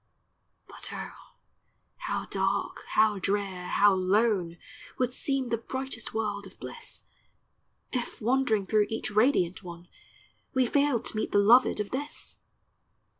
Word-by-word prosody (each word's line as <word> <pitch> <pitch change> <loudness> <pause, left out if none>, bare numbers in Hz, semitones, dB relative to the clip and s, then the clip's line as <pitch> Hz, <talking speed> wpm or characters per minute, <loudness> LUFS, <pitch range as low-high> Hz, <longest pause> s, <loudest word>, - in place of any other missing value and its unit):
But - - -5
oh, - - -9 0.6
how - - -3
dark, - - -1
how 215 -2 +3
drear, 195 -2 -1
how 205 0 +5
lone, 190 -2 +1 0.4
Would 250 -1 0
seem 270 -2 0
the 230 -1 0
brightest 260 -1 -5
world 205 -2 -2
of 190 - -18
bliss, - - -7 0.9
If, 250 -1 -3
wandering 240 -3 +2
through 210 0 +2
each 225 -1 -3
radiant 210 -5 +2
one, 175 -1 -10 0.7
We 260 -1 +4
failed 280 -2 +2
to - - -2
meet 215 - -2
the - - +3
loved 225 +4 +5
of 210 - -3
this 290 +3 -4
215 Hz, 130 wpm, -28 LUFS, 200-250 Hz, 0.9 s, how